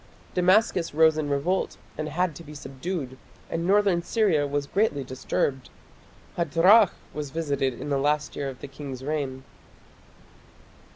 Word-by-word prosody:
Damascus 180 Hz, -2 st, +3 dB
rose 160 Hz, 0 st, +5 dB
in 155 Hz, -2 st, -2 dB
revolt 165 Hz, +7 st, 0 dB, 0.2 s
and 155 Hz, 0 st, -4 dB
had 175 Hz, +2 st, 0 dB
to 170 Hz, -, -10 dB
be 150 Hz, -1 st, -11 dB
subdued, 135 Hz, -1 st, -5 dB, 0.3 s
and 170 Hz, +1 st, -1 dB
northern 195 Hz, -3 st, +3 dB
Syria 170 Hz, -7 st, +2 dB
was 145 Hz, 0 st, -1 dB
greatly 170 Hz, -5 st, 0 dB
disturbed. 130 Hz, +1 st, -2 dB, 0.7 s
Hadrach 180 Hz, +5 st, +5 dB, 0.2 s
was 150 Hz, -2 st, -4 dB
visited 140 Hz, -5 st, -1 dB
in -, -, -5 dB
the 140 Hz, -, +2 dB
last 150 Hz, +1 st, 0 dB
year 140 Hz, -1 st, -2 dB
of 130 Hz, -, -10 dB
the -, -, -6 dB
king's 135 Hz, -2 st, -8 dB
reign. 135 Hz, -3 st, -3 dB
150 Hz, 140 wpm, -26 LUFS, 140-175 Hz, 0.7 s, rose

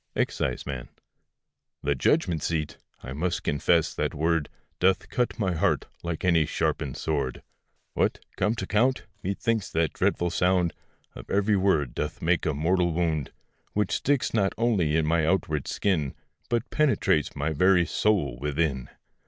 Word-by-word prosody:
EXCISEMAN. 65 Hz, -4 st, -2 dB, 0.9 s
The 70 Hz, -, +2 dB
judgment 80 Hz, +4 st, +1 dB
seat! 80 Hz, -2 st, -2 dB, 0.2 s
I 65 Hz, -, -6 dB
must 85 Hz, +5 st, -2 dB
confess 80 Hz, +2 st, +2 dB
that -, -, -2 dB
word 80 Hz, 0 st, +1 dB, 0.3 s
Doth 95 Hz, +1 st, +2 dB
cut 125 Hz, 0 st, -1 dB
my 95 Hz, -5 st, 0 dB
heart, 80 Hz, -, +1 dB, 0.2 s
like 85 Hz, 0 st, -3 dB
any 85 Hz, -4 st, +4 dB
sharpened 70 Hz, -5 st, -1 dB
sword: 70 Hz, -5 st, -2 dB, 0.5 s
What! -, -, +1 dB, 0.2 s
come 110 Hz, +2 st, +1 dB
t' 105 Hz, -, -4 dB
account! 120 Hz, +7 st, +1 dB, 0.2 s
methinks 100 Hz, +2 st, -1 dB
the 80 Hz, -1 st, +1 dB
dreadful 85 Hz, +4 st, 0 dB
sound 90 Hz, -1 st, +2 dB, 0.4 s
Of -, -, -11 dB
every 100 Hz, +1 st, +2 dB
word 80 Hz, -10 st, +2 dB
doth 75 Hz, -, -3 dB
make 85 Hz, +1 st, +1 dB
a 75 Hz, -, 0 dB
mortal 85 Hz, +3 st, +2 dB
wound, 80 Hz, -4 st, -1 dB, 0.4 s
Which 105 Hz, -2 st, 0 dB
sticks 140 Hz, -1 st, +1 dB
not 100 Hz, -3 st, +2 dB
only 100 Hz, -10 st, +2 dB
in 80 Hz, -1 st, +2 dB
my 80 Hz, +1 st, +2 dB
outward 80 Hz, -6 st, 0 dB
skin, 80 Hz, -9 st, 0 dB, 0.3 s
But 120 Hz, +1 st, -1 dB
penetrates 135 Hz, -, +2 dB
my 75 Hz, +3 st, -1 dB
very 90 Hz, +3 st, +4 dB
soul 85 Hz, -, +1 dB
within. 70 Hz, -2 st, -1 dB
85 Hz, 145 wpm, -26 LUFS, 75-95 Hz, 0.9 s, any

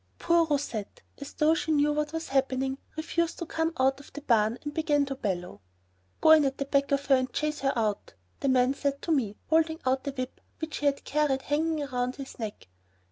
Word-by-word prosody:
Poor 335 Hz, -1 st, +3 dB
Rousette, 275 Hz, -8 st, -3 dB, 0.2 s
as 280 Hz, -, -8 dB
though 305 Hz, +1 st, +3 dB
she 320 Hz, 0 st, -1 dB
knew 295 Hz, 0 st, +3 dB
what 300 Hz, 0 st, -1 dB
was 325 Hz, 0 st, -4 dB
happening, 265 Hz, 0 st, 0 dB, 0.2 s
refused 335 Hz, +1 st, -1 dB
to 340 Hz, -, -4 dB
come 325 Hz, +1 st, -1 dB
out 270 Hz, +1 st, +3 dB
of 280 Hz, -, -14 dB
the 295 Hz, -, -7 dB
barn 225 Hz, -3 st, +2 dB
and 295 Hz, 0 st, -5 dB
began 295 Hz, -3 st, +2 dB
to 275 Hz, -, -4 dB
bellow. 180 Hz, -, -4 dB, 0.6 s
"Go 315 Hz, -, +6 dB
in 315 Hz, -1 st, +8 dB
at 270 Hz, -1 st, 0 dB
the 275 Hz, -, -2 dB
back 280 Hz, 0 st, +1 dB
of 280 Hz, 0 st, +1 dB
her 275 Hz, -, +5 dB
and 255 Hz, -1 st, -1 dB
chase 300 Hz, 0 st, -2 dB
her 270 Hz, 0 st, +1 dB
out," 210 Hz, -, -1 dB, 0.2 s
the 275 Hz, -, 0 dB
man 255 Hz, 0 st, +4 dB
said 280 Hz, 0 st, -2 dB
to 335 Hz, -, -1 dB
me, 230 Hz, -9 st, 0 dB
holding 320 Hz, 0 st, +3 dB
out 260 Hz, +2 st, 0 dB
a -, -, 0 dB
whip 255 Hz, -1 st, -6 dB, 0.2 s
which 315 Hz, -1 st, -5 dB
he 290 Hz, -, 0 dB
had 280 Hz, 0 st, 0 dB
carried 285 Hz, -3 st, 0 dB
hanging 305 Hz, +1 st, 0 dB
round 250 Hz, -1 st, -2 dB
his 275 Hz, -2 st, -9 dB
neck. 215 Hz, -, -6 dB
280 Hz, 220 wpm, -28 LUFS, 260-300 Hz, 0.6 s, in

